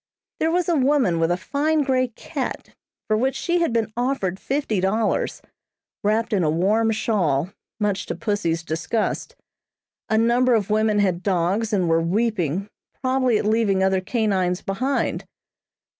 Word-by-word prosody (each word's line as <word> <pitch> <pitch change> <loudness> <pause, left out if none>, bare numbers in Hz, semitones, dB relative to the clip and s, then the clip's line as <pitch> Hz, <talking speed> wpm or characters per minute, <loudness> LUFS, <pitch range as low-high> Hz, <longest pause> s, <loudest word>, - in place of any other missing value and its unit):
There 320 - +2
was 350 +1 +1
a 345 - +2
woman 260 - +2
with 165 0 +2
a 175 - +1
fine 295 +9 0
grey 260 -2 +1
cat, 235 - -5 0.4
for 215 - +2
which 260 +5 0
she 350 0 0
had 335 -6 +1
been 225 -2 -1
offered 240 -7 -1
fifty 270 -7 -1
dollars, 210 +3 0 0.6
wrapped 220 +2 +1
in 195 - +2
a 155 - +2
warm 205 +8 +2
shawl, 185 -8 0 0.3
much 205 -2 -1
to - - -3
pussy's 205 -7 -1
disgust. 165 +8 -2 0.7
A 220 - +2
number 240 +2 +3
of 210 -2 -1
women 215 0 +2
had 185 -4 +1
dogs 195 +4 0
and 190 -4 +1
were 165 0 +3
weeping, 190 -1 0 0.3
probably 255 -3 +2
at - - -2
leaving 210 -3 +2
other 190 0 +2
canines 190 -4 0
behind. 255 +8 -1
215 Hz, 155 wpm, -23 LUFS, 185-245 Hz, 0.7 s, number